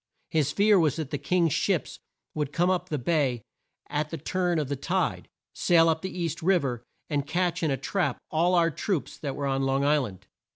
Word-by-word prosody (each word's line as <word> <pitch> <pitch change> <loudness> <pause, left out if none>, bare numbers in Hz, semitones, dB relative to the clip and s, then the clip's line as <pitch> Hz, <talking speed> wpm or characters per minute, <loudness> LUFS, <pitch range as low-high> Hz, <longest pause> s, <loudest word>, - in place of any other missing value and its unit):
His 150 -3 +2
fear 205 +3 +4
was 155 -4 +2
that 155 -4 -5
the 145 - -2
King's 165 +1 +1
ships - - 0 0.3
would 150 -2 -2
come 175 +4 +2
up 180 0 -1
the 150 - -1
bay 135 -5 0 0.4
at 150 +1 -2
the 165 - -4
turn 175 +3 -1
of 150 -3 0
the 140 - -2
tide, 135 - -1 0.3
sail 165 -2 +4
up 160 0 0
the 190 - -3
East 170 0 -2
Riv 175 -3 +3
er 120 -3 -3 0.2
and 145 -2 -1
catch 175 +2 0
in 160 - +1
a 135 - 0
trap 145 0 -1
all 170 +3 +2
our 170 -1 +3
troops 180 +1 -2
that 140 -3 -4
were 145 - -3
on 135 0 0
Long 135 +1 +1
Isl 145 -2 +3
and. 95 0 -15
155 Hz, 215 wpm, -27 LUFS, 140-175 Hz, 0.4 s, fear